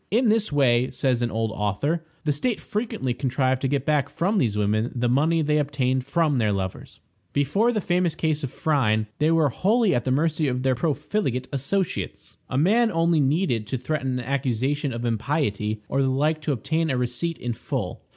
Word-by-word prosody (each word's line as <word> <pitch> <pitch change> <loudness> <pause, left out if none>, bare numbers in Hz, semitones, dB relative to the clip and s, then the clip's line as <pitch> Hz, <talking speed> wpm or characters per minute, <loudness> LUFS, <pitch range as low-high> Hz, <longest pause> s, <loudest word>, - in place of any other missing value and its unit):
In 230 +2 +3
this 215 -3 +1
way, 130 -3 +3
says 125 -3 0
an 120 - 0
old 110 0 -1
author, 125 - -1 0.2
the 150 - +1
state 205 - -1
frequently 205 - -3
contrived 130 0 0
to 135 - +1
get 140 0 -1
back 150 -3 +1
from 195 +4 0
these 110 -5 +1
women 105 +3 +1
the 120 0 0
money 155 +6 +2
they 150 0 +2
obtained 130 -3 0
from 150 -3 +1
their 110 -2 +2
lovers. 95 -2 -4 0.3
Before 175 - +2
the 215 -3 -1
famous 175 -2 +1
case 155 -2 -1
of 135 - -2
Phryne, 120 -10 +1
they 150 +1 +3
were 165 -3 +3
wholly 205 - +2
at 120 - 0
the - - -2
mercy 155 +3 +1
of 125 -1 -1
their 130 -1 +3
profligate 140 - -1
associates. 165 +8 -3
A 130 - -1
man 220 - +3
only 165 -1 +2
needed 135 - +1
to 130 - -2
threaten 130 -1 -2
an 125 - -5
accusation 135 +1 -1
of 120 0 -4
impiety 110 -3 -1
or 135 - 0
the 135 - +2
like 150 +4 +1
to 150 - -1
obtain 160 +5 -1
a 130 - 0
receipt 125 +7 -2
in 120 -1 -3
full. - - -4
140 Hz, 195 wpm, -24 LUFS, 125-160 Hz, 0.3 s, In